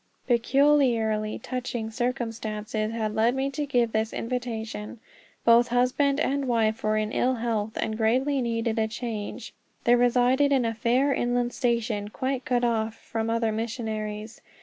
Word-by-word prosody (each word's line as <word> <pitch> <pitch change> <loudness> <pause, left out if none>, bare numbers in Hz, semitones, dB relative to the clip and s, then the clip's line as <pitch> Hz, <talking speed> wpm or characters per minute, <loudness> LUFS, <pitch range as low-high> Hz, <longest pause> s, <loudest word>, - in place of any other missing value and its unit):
Peculiarly 235 -4 +2
touching 240 -2 -4
circumstances 225 -3 -2
had 220 -2 -2
led 225 +3 +2
me 270 +1 -1
to 290 +1 -3
give 240 -4 +2
this 220 0 -1
invitation. 230 -2 -4 0.5
Both 235 +1 +6
husband 255 +4 +2
and 280 -1 0
wife 225 -2 +1
were 215 0 +1
in 215 0 -1
ill 255 +2 +1
health, 225 -2 -2
and 220 - -1
greatly 255 +5 +1
needed 230 -1 -1
a 220 - +2
change. 225 0 -5 0.3
They 240 - +4
resided 245 +3 +3
in 265 -3 +3
a 225 - 0
far 245 +5 +2
inland 245 -1 0
station, 230 -4 0
quite 260 +3 -3
cut 245 -1 +1
off 225 -2 0
from 225 0 -4
other 230 -1 +1
missionaries. 215 -1 -4
235 Hz, 150 wpm, -26 LUFS, 220-250 Hz, 0.5 s, Both